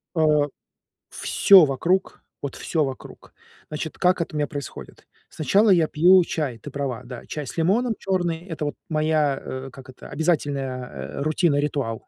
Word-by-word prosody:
Э. 150 -2 +3 0.6
Всё 190 -5 +5
вокруг, 170 +8 -1 0.2
вот, 140 - -4
всё 160 -2 -1
вокруг. 135 -2 -8 0.4
Значит, 155 +1 -5
как 180 -1 +2
это 160 - -5
у - - -1
меня 150 - +1
происходит? 145 -2 -9 0.2
Сначала 200 +8 +2
я 170 -5 +4
пью 180 +4 +5
чай, 150 -8 -3
ты 140 +6 -10
права, 135 -4 -3
да, 125 -1 -9
чай 150 -2 -5
с - - -8
лимоном, 215 +9 +1
чёрный- 175 -3 -1
это, 160 -3 -4
вот, 145 - -3
моя, 155 -3 +1
э, 130 +1 -6
как 130 +1 -13
это, 130 - -12
обязательная, 140 -5 -1 0.3
э, - - -3
рутина, 155 0 +1
ритуал. 140 -6 -2
150 Hz, 165 wpm, -23 LUFS, 140-170 Hz, 0.6 s, Всё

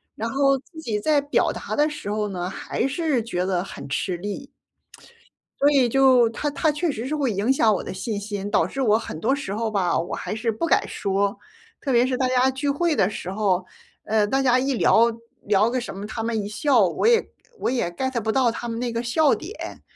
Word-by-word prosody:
然 225 - -3
后 275 +2 +3
自 320 +4 -14
己 215 -7 -2
在 295 +6 +2
表 285 +2 +1
达 - - -5
的 300 +1 +3
时 295 -9 -6
候 210 0 -1
呢， 180 -2 -4
还 235 +6 -2
是 285 -3 0
觉 180 -5 -2
得 180 -2 0
很 195 - -9
吃 175 +5 -2
力。 205 +10 -6 1.1
所 285 +1 +4
以 265 -4 +4
就 260 -2 +5
它 230 +6 -4
它 300 +2 +1
确 310 +2 -1
实 230 -3 -5
是 305 - -1
会 275 -6 0
影 205 +6 +1
响 225 -5 +4
我 - - -4
的 - - -6
信 210 +1 -3
心， 205 -1 -5
导 - - +3
致 270 - -4
我 215 -4 +4
很 190 -8 -7
多 250 +9 +1
时 275 -9 -5
候 225 +1 -1
吧， 190 -4 +1
我 170 - -4
还 - - -4
是 225 +1 -1
不 220 +10 -2
敢 - - +2
说。 200 0 -1 0.5
特 275 - -2
别 240 +1 +5
是 255 - 0
大 260 - +1
家 255 +1 +3
聚 280 +2 -2
会 310 +2 +1
的 190 - +2
时 185 -3 -6
候， 190 -3 0 0.4
呃， 215 -1 +2
大 270 +5 +1
家 255 -1 +4
一 270 +1 0
聊 230 0 +5 0.4
聊 210 +2 +3
个 255 -1 -1
什 215 - -7
么， 200 - -6
他 225 +1 -5
们 225 -1 -1
一 - - -4
笑 220 +1 +3
我 170 - -2
也 465 -1 +4 0.3
我 - - 0
也 240 -9 0
get 260 +5 -2
不 220 +1 0
到 250 -2 +3
他 240 +1 -5
们 230 0 -4
那 245 -1 -2
个 230 - -1
笑 285 +5 +3
点。 385 +8 -8
235 Hz, 255 characters per minute, -23 LUFS, 205-275 Hz, 1.1 s, 就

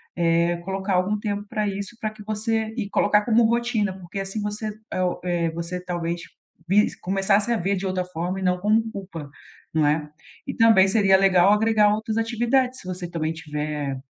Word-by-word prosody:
eh, 170 0 +2
colocar 195 0 -1
algum 190 +4 +1
tempo 205 -1 -3
pra 210 -1 -1
isso, 200 +3 -5
pra 215 - -2
que 215 -1 -13
você 220 +1 -1
e 205 -5 -3
colocar 210 0 +3
como 235 0 +4
rotina 235 -4 +1
porque 180 +2 -7
assim 195 +2 -4
você, 210 +1 -3 0.2
é 185 - -1
o 180 - -1
eh, 170 -2 0
o - - -8
você, 170 +2 -4
talvez, 175 -1 -3 0.5
vis 205 +3 +3
começasse 195 +4 +1
a 235 - +2
ver 195 +2 0
de 195 - -4
outra 185 -1 -1
forma 180 +2 -4
e 190 - -5
não 180 0 +2
como 215 +4 +3
culpa, 170 -8 -8 0.4
não 155 -2 +3
é? 150 0 0 0.4
E 270 - -3
também 225 -4 +6
seria 195 -2 +4
legal 190 0 +5
agregar 210 -1 +3
outras 220 +1 -3
atividades 240 +3 +1
se 185 - -12
você 180 -1 -5
também 160 -2 -2
tiver 150 -3 -4
195 Hz, 195 wpm, -24 LUFS, 175-215 Hz, 0.5 s, também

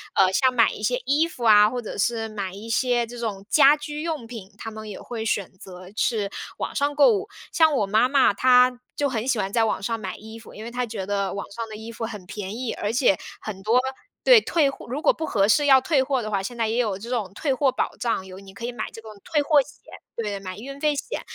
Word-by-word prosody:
呃， 190 -1 +5
像 255 +5 +3
买 230 -2 +4
一 - - -8
些 245 +4 0
衣 295 +5 +3
服 255 -7 -9
啊， 210 -2 +7
或 245 0 -4
者 220 - -7
是 225 +2 0
买 200 -3 -5
一 215 +4 -9
些 245 0 +1
这 240 +1 -10
种 200 -4 -4
家 285 -1 +7
居 300 0 -6
用 315 -7 -3
品， 225 -5 -10
他 225 - -7
们 215 0 -8
也 205 - -7
会 225 -2 -5
选 200 -3 -1
择 185 -1 -11
是 210 -4 0 0.3
网 - - -3
上 285 0 0
购 375 +11 +6
物。 405 0 -2 0.2
像 320 -2 +4
我 215 -7 +2
妈 215 +5 +3
妈， 275 -6 +4
她 250 +2 +4 0.2
就 285 -1 0
很 235 -1 -3
喜 260 -4 +2
欢 195 -1 -2
在 225 +1 +2
网 215 - -2
上 230 +1 -2
买 190 -3 -5
衣 220 +1 -11
服， 230 - -14
因 215 - -9
为 235 - -7
她 250 0 -2
觉 215 -4 -5
得 200 0 -1
网 200 - -4
上 230 +2 -5
的 215 - -8
衣 220 +2 -8
服 230 0 -5
很 210 -5 -8
便 205 +1 -6
宜， 250 -2 -3
而 210 +2 -3
且 245 -6 +3 0.2
很 195 -3 -7
多 235 +4 +3 0.4
对， - - +8
退 320 -8 +2
货 - - -9
如 265 +5 -4
果 - - +5
不 320 - -4
合 200 -9 +2
适 290 +8 +3
要 270 -2 +7
退 285 -1 +2
货 265 -1 0
的 215 -1 -5
话， 195 - 0
现 235 +5 -6
在 225 -1 0
也 230 - -1
有 215 -6 0
这 230 +4 -9
种 210 -6 -2
退 275 +5 -1
货 270 +1 +2
保 - - -2
障， 225 -5 -1
有 190 0 -10
你 195 -1 -14
可 200 - -11
以 240 - -2
买 220 -3 -5
这 225 - -11
个 220 - -11 0.2
退 300 - +1
货 290 0 +4
险 290 - -11 0.4
对， 210 -3 -3
买 185 -1 -7
运 275 +5 -8
费 300 -1 +1
险， - - -4
230 Hz, 285 characters per minute, -24 LUFS, 210-265 Hz, 0.4 s, 对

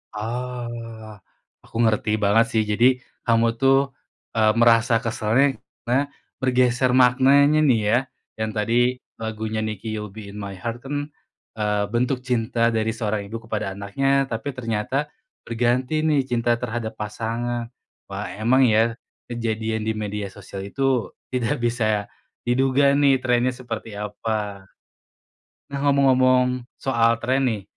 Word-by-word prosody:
Oh. 115 -1 -6 0.5
Aku - - -21
ngerti 110 -1 +2
banget 105 +2 +3
sih 110 - +3
jadi 120 +5 +3 0.3
kamu 115 0 +2
tuh 135 +1 +3 0.4
e 115 - -2 0.2
merasa 115 0 +4
keselnya 115 +5 +1 0.2
karena 130 +4 +1 0.3
bergeser 125 -1 +2
maknanya 135 +4 +5
nih 120 -6 +4
ya, 120 - +5 0.4
yang 110 0 -1
tadi 120 +4 +2 0.2
lagunya 110 0 -3
NIKI 110 +1 -4
"You'll 105 - -5
Be 105 -1 -9
In 105 - -10
My 100 -1 -5
Heart" 115 +6 -6
kan, 145 +1 -3 0.5
eee, 105 -1 +1
bentuk 125 +2 0
cinta 115 -1 +1
dari 110 0 0
seorang 105 -3 -2
ibu 115 +2 -6
kepada 105 -3 -3
anaknya, 135 +8 +1
tapi 115 +5 -3
ternyata 130 +4 -2 0.3
berganti 125 +5 0
nih 145 -3 +3
cinta 120 -2 +1
terhadap 115 -1 -4
pasangan. 115 +3 -3 0.4
Wah - - -5
emang 120 +5 +3
ya 115 -1 +4 0.3
kejadian 110 -2 -2
di 110 - 0
media 105 -1 -3
sosial 95 -1 -8
itu 130 +4 0 0.2
tidak 125 +2 0
bisa 110 -3 0 0.4
diduga 135 +3 +3
nih 140 -2 +4
trend-nya 125 0 +2
seperti 120 -3 -7
apa. 105 -1 -4 1.1
Nah 140 - -2
ngomong-ngomong 130 -2 +3
soal 115 -3 +2
trend 130 +3 +1
nih, 110 -4 -2
115 Hz, 130 wpm, -23 LUFS, 110-130 Hz, 1.1 s, maknanya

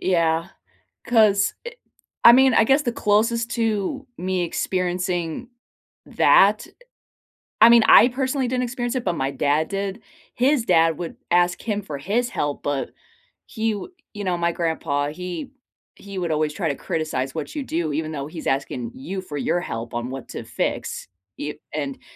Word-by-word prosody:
Yeah, 165 -2 +1 0.6
'cause, 215 -4 +4
eh, 485 - -5 0.5
I 235 - +10
mean, 265 0 +5
I - - +5
guess 270 +6 +3
the 250 -5 -1
closest 230 +2 +1
to 225 +3 -1
me 185 0 -1
experiencing 180 +1 -2 0.6
that - - +4 0.9
I 225 +2 +9
mean, 235 -1 +7
I 225 - +9
personally 260 +1 -1
didn't 250 0 -1
experience 240 0 -3
it, 255 - -1
but 180 - 0
my 135 +1 -1
dad 145 +3 +1
did. 200 +2 -3 0.3
His 260 0 +2
dad 165 -4 +3
would 170 -2 -6
ask 175 0 +2
him 210 -2 -2
for 150 -7 -6
his 230 - -1
help, 145 -1 -2
but 145 -2 -2 0.6
he, 225 0 -1
w 210 - -7 0.2
you 205 - -5
know, 180 -2 0
my 170 0 +1
grandpa, 160 -4 -1
he 180 - -6 0.5
he 200 -1 -8
would 175 -2 -2
always 155 -1 0
try 165 +1 -2
to 140 - -2
criticize 135 -5 -3
what 160 - -5
you 290 - -2
do, 165 - -2
even 155 +1 -2
though 140 -1 -5
he's 160 0 -9
asking 125 -3 -2
you 190 +8 -5
for 170 -6 -8
your 145 - 0
help 115 -8 -5
on 120 +1 -3
what 135 -1 -7
to - - -7
fix, - - -3 0.3
you 150 +1 -5 0.2
and 140 -3 -3
h - - -30
180 Hz, 175 wpm, -23 LUFS, 155-230 Hz, 0.9 s, I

